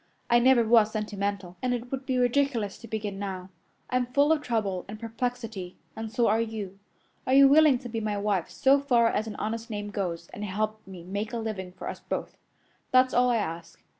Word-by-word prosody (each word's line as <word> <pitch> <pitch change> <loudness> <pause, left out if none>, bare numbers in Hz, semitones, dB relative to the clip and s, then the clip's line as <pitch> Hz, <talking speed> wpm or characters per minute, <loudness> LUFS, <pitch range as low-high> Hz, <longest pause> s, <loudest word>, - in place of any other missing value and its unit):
I 240 - +6
never 250 -1 +5
was 225 -1 +5
sentimental, 200 -4 -3
and 250 -1 +1
it 245 +1 -7
would 270 0 -4
be 260 -2 0
ridiculous 245 -4 +1
to 230 - -11
begin 205 -3 -4
now. 190 -2 -5 0.4
I'm 250 -1 +1
full 285 +4 +3
of 315 -2 +3
trouble 210 -8 -1
and 210 +2 -8
perplexity, 225 -5 -4 0.2
and 220 -1 -5
so 235 +1 +2
are 220 +2 +3
you. 210 -4 -5 0.5
Are 260 - +3
you 275 0 +9
willing 295 -1 +6
to 245 - -9
be 225 -1 -3
my 210 -1 -1
wife 200 -4 0
so 275 +1 +3
far 240 -4 +3
as 215 0 -1
an 215 - -6
honest 225 +2 -4
name 205 -1 -4
goes, 170 -4 -3
and 205 - -7
help 215 +2 -2
me 185 -3 -10
make 200 +5 -4
a - - -1
living 215 -5 -4
for - - -8
us - - -5
both? - - -5 0.5
That's 255 0 +4
all 250 0 +4
I 240 - +3
ask. 170 -4 -5
220 Hz, 210 wpm, -27 LUFS, 200-245 Hz, 0.5 s, you